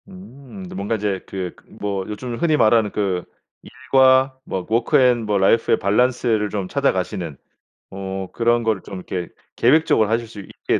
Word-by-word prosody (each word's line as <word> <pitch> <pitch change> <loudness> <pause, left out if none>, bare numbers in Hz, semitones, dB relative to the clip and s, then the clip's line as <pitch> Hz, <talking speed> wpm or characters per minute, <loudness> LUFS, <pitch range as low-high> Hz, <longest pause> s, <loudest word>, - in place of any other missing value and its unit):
음 185 -3 -12
뭔가 100 +3 -2
이제 100 -3 -2
그 95 -2 -5 0.2
뭐 100 -2 -3
요즘 120 +3 -5
흔히 155 0 +2
말하는 110 -3 +3
그 95 -4 -1 0.4
일과 130 0 +2
뭐 95 -1 -4
워크 115 +2 +2
앤 125 -3 +3
뭐 105 -1 +1
라이프의 100 +4 +3
밸런스를 110 0 +1
좀 100 -2 -3
찾아가시는 90 - -1 0.5
어 95 0 -5
그런 120 0 +1
거를 110 -4 0
좀 100 - -9
이렇게 90 -1 -5 0.3
계획적으로 120 -5 +3
하실 115 +1 0
수 110 - -11
있게 - - -2
110 Hz, 305 characters per minute, -21 LUFS, 95-125 Hz, 0.5 s, 말하는